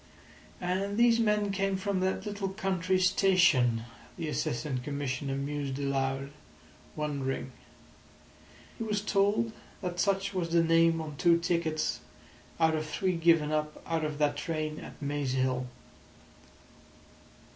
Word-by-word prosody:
"And 190 +3 -1
these 235 0 +5
men 210 -2 +2
came 195 0 0
from 190 0 -1
that 190 +3 -1
little 205 -2 -3
country 190 -2 0
station," 175 - +4 0.3
the 165 -3 -3
Assistant 125 -2 -2
Commissioner 140 -1 -3
mused 140 -1 -3
aloud, 135 0 -1 0.6
wondering. 140 -3 -3 1.3
He - - -2
was 210 -2 -1
told 205 +2 +2 0.3
that 175 -1 -3
such 195 0 +1
was 175 -3 -1
the 170 0 +4
name 165 0 +4
on 150 -2 -7
two 170 +2 +5
tickets 170 -2 0 0.6
out 160 -1 +4
of 155 0 -2
three 185 +4 0
given 165 -2 +3
up 150 0 -1
out 165 -1 -1
of 150 -1 -2
that 145 -1 +1
train 155 -1 -3
at - - -10
Maze 145 -2 -2
Hill. 130 -1 0
165 Hz, 130 wpm, -30 LUFS, 145-190 Hz, 1.3 s, these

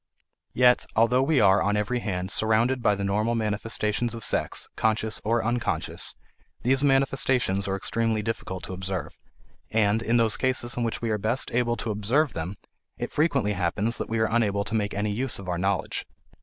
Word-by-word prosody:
Yet, 125 0 +4
although 115 +3 +4
we 140 +1 +2
are, 95 -2 +5
on 105 +1 +1
every 105 +4 -1
hand, 95 -4 -3
surrounded 115 +5 +2
by 105 -3 +3
the 100 - -4
normal 105 +4 0
manifestations 110 +1 -1
of 115 - -5
sex, - - 0
conscious 110 0 0
or 115 +1 0
unconscious, 120 0 -1 0.5
these 135 +3 +2
manifestations 135 -7 +2
are 95 - -1
extremely 110 +2 -1
difficult 105 -5 -4
to - - -5
observe, 95 0 -4 0.5
and, 110 0 +2
in 115 +1 +1
those 115 -2 +2
cases 130 -2 +1
in 125 - -3
which 115 0 -2
we 115 - 0
are 105 - 0
best 115 +6 0
able 120 0 +1
to 110 +2 -3
observe 120 +9 +1
them, 85 +5 -4 0.4
it - - -4
frequently 140 -9 +1
happens 100 +5 -1
that - - -4
we 115 - -1
are 110 - +2
unable 100 -3 +1
to 100 - -7
make 105 -2 -1
any 105 +1 -1
use 125 +5 +1
of 100 - -9
our 90 -1 -2
knowledge. 95 +1 -1
110 Hz, 185 wpm, -26 LUFS, 100-120 Hz, 0.5 s, are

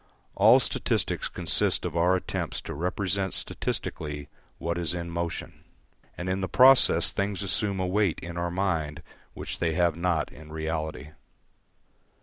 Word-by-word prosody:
All - - +6
statistics - - 0
consist - - +1
of 85 -2 -4
our 90 +2 +3
attempts 95 - -3
to - - -6
represent 95 +4 -1
statistically 75 -1 -3 0.3
what 85 +1 -2
is 85 0 0
in 85 -1 -5
motion; 85 0 -4 0.5
and 85 - -5
in 95 +1 -1
the 95 - -2
process 130 +1 +6
things 100 0 -1
assume 100 0 0
a 95 - 0
weight 95 -1 +1
in 85 0 -7
our 85 0 -1
mind 85 -4 -2 0.3
which - - -5
they 85 -2 +1
have 85 -1 +2
not 85 -2 0
in 75 +1 -13
reality. 80 -3 -4
85 Hz, 145 wpm, -27 LUFS, 80-95 Hz, 0.5 s, All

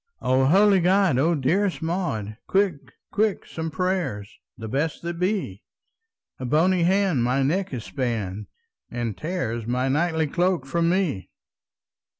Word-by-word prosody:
"O 130 +1 +2
holy 195 +6 +5
God! 180 -5 +3
O 165 +5 +3
dearest 180 +8 +1
Maud, 160 - -2
Quick, 190 -7 0 0.2
quick, 210 0 0
some 160 0 -5
prayers, 170 - -2 0.2
the 110 - -6
best 145 +9 -2
that 170 0 -4
be! 180 - -2 0.8
A 130 - -4
bony 170 +7 +2
hand 185 -6 +2
my 130 +3 +1
neck 185 +8 0
has 125 -7 -5
spanned, 105 -6 -3 0.4
And 120 -3 -3
tears 120 - -3
my 125 +2 0
knightly 160 +2 +1
cloak 175 -1 0
from 165 +5 +1
me!" 175 - 0
160 Hz, 140 wpm, -24 LUFS, 125-185 Hz, 0.8 s, holy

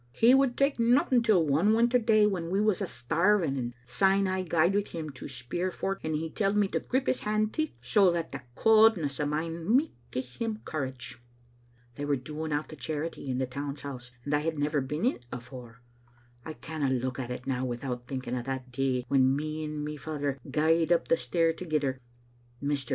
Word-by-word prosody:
He 235 +3 +5
would 270 -2 +3
tak' 275 -2 +2
nothing 245 +1 +4
till 210 -8 +4
one 165 +10 +3
winter 240 +2 +4
day 220 -2 +4
when 180 -5 -1
we 190 +3 +1
was 210 -3 +2
a* - - -1
starving, 170 +3 +1
and 120 -2 -4
syne 195 +9 +2
I 185 0 0
gaed 170 0 +2
wi* 205 - +3
him 155 -3 -5
to 130 - -9
speir 135 +8 -3
for't, 195 +2 -3
and 160 -1 -1
he 160 +1 -3
telled 205 -1 0
me 205 -1 +3
to - - 0
grip 260 +1 -1
his - - +1
hand 215 0 0
ticht, 310 -1 -1
so 200 -5 +4
that 170 -1 -2
the 140 - -6
cauldness 215 -10 +4
o' 150 - 0
mine 165 +3 -3
micht 300 +4 0 0.2
gie 130 - -1
him 215 - -5
courage. 130 -5 -5 0.8
They 145 - -3
were 145 0 +2
doling 150 +4 -5
out 145 +1 -1
the 155 - -8
charity 150 +1 -4
in 125 - -1
the 130 - 0
Town's 140 +2 -5
House, 130 -3 -7 0.2
and 145 - -2
I 145 - +4
had 160 +1 -2
never 145 0 +1
beenin't 150 - -1
afore. 125 -1 -9 0.6
I 160 - -6
canna 155 -2 -3
look 130 0 -1
at 125 -2 -4
it 125 0 -5
now 130 -1 -1
without 125 0 -4
thinking 130 -1 -4
o' 125 - -2
that 130 0 -5
day 125 -1 0
When 130 0 +4
me 155 +2 -3
and 150 -1 -4
my 150 0 -5
father 145 -2 -3
gaed 160 +2 +2
up 170 - +2
the 165 - +4
stair 165 +6 +1
thegither. 150 -6 -1 0.6
Mr. 140 -2 -2
155 Hz, 205 wpm, -29 LUFS, 130-195 Hz, 0.8 s, He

